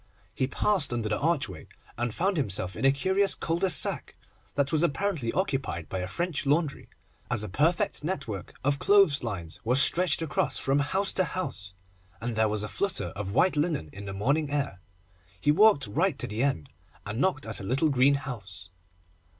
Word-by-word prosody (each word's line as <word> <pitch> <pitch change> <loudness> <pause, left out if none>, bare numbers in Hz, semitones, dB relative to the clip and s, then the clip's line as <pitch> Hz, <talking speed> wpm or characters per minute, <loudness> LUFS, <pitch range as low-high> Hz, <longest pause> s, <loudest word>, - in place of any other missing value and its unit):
He 130 - -1
passed 170 +1 +1
under 115 -3 -2
the 105 - -1
archway, 135 - -1 0.3
and 120 0 -2
found 190 - 0
himself 95 - 0
in 115 - -2
a 135 - +6
curious 190 +8 +2
cul 165 +1 -2
de 190 0 +2
sac, 155 - +3 0.4
that 140 -1 +1
was 155 -2 +2
apparently 170 -6 0
occupied 135 - -2
by 95 - -3
a 90 - -3
French 160 - -3
Laundry, 150 0 0 0.4
as 115 -4 +2
a - - -4
perfect 170 - +1
network 115 - -5
of 140 +1 +1
clothes 195 -8 +4
lines 95 -9 -4
was 125 +3 +3
stretched 170 +2 +4
across 155 - -1
from 135 +1 +1
house 190 +8 0
to 185 - +3
house, 125 - -5 0.4
and 115 0 -4
there 110 0 +2
was 105 0 -1
a - - -3
flutter 200 - -1
of 100 -1 -6
white 180 +8 +3
linen 150 - -1
in 100 +1 -9
the 95 - -6
morning 140 +10 0
air. 140 -10 -2 0.6
He 150 - +3
walked 195 - +5
right 150 - 0
to - - -3
the 105 +3 -3
end, 130 - -1 0.4
and 105 +5 -3
knocked 180 -8 0
at 110 0 -3
a - - -8
little 135 +9 +1
green 140 +1 +4
house. 100 -10 -5
140 Hz, 190 wpm, -27 LUFS, 105-170 Hz, 0.6 s, a